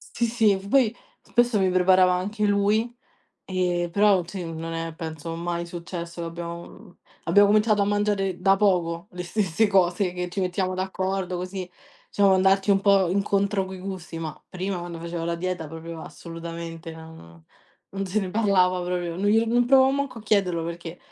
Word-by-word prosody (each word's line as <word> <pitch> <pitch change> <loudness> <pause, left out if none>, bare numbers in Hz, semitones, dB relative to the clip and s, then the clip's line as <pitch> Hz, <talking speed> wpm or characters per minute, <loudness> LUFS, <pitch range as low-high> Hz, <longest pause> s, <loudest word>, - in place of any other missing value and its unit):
Sì, 235 - +1
sì. 220 -4 +3
Poi 240 -2 +3 0.3
spesso 240 -3 +2
mi 190 -1 +2
preparava 185 0 +4
anche 205 +4 -1
lui, 210 +4 +2 0.5
ehm, 180 -2 -1
però 200 -2 +3
sì, 185 0 -6
non 165 +1 -5
è 165 -1 -4
penso 165 -1 -6
mai 170 0 -3
successo, 170 0 -6
che - - -3
abbiam 170 +4 -9 0.3
abbiamo 205 +4 +5
cominciato 210 0 +3
a - - +3
mangiare 205 -3 0
da 195 +1 +4
poco 180 -2 +1
le 180 0 -6
stesse 195 +2 +1
cose, 185 -1 +2
che 180 0 -4
ci 195 - -3
mettiamo 185 0 -1
d'accordo, 190 0 -2
così 185 0 -5 0.4
siamo 200 -1 +3
andati 195 +1 +3
un 195 -1 +4
po' 195 -3 +4
incontro 200 0 +1
coi 190 0 -8
gusti, 185 -4 -6
ma 155 -2 -6
prima, 185 0 -3
quando 175 -1 -6
facevo 170 0 -5
la 170 0 -1
dieta, 175 -2 -3
proprio 165 0 -8
assolutamente 165 0 -8
non 160 - -13 0.5
non 195 0 -2
se 200 +4 0
ne 190 -3 -2
parlava 185 -4 +2
proprio, 175 -1 -2
non 200 +2 -1
glielo 225 +2 +4
non 240 0 +3
provavo 265 0 +6
manco 280 -4 -2
a - - -11
chiederlo, 185 -6 +1
perché 170 0 -7
185 Hz, 175 wpm, -25 LUFS, 170-200 Hz, 0.5 s, provavo